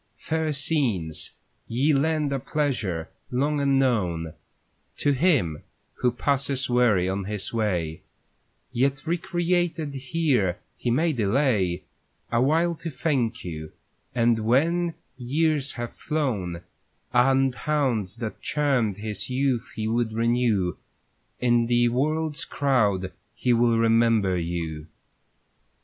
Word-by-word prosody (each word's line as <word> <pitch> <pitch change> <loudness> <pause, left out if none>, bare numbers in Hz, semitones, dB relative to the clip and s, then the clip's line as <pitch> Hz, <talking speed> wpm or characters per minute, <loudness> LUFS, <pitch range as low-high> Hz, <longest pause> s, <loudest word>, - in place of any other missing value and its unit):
Fair 160 -1 -1
scenes, 130 - +1 0.4
ye 135 +7 +2
lend 150 0 +1
a 135 - -1
pleasure, 120 - -2 0.2
long 145 +4 0
unknown, 110 - +1 0.6
To 145 - +2
him 135 - +2 0.4
who 125 - +2
passes 135 +1 0
weary 120 -7 +3
on 95 +1 -2
his 105 +1 -4
way; 90 -8 -1 0.7
Yet 135 +4 0
recreated 175 -2 0
here 130 - 0 0.2
he 120 - -3
may 155 +7 +2
delay 105 -6 +1 0.5
A 120 0 +2
while 165 +6 +3
to 165 - -5
thank 125 - -1
you; 80 -3 -6 0.4
and 115 -1 +3
when 160 +10 +2 0.2
years 145 +3 0
have 120 -1 -6
flown, 110 - -2 0.5
And 135 +1 +4
haunts 130 -10 -1
that 110 -3 -6
charmed 130 -9 +1
his 105 +1 -3
youth 130 -2 0
he 110 -1 -2
would 115 0 0
renew, 115 -6 +1 0.6
In 120 -1 +3
the 120 0 +3
world's 150 +4 0
crowd 105 -10 +1 0.2
he 125 - +1
will 115 -1 +3
remember 115 -4 +3
you. 85 -3 -3
125 Hz, 115 wpm, -25 LUFS, 105-145 Hz, 0.7 s, And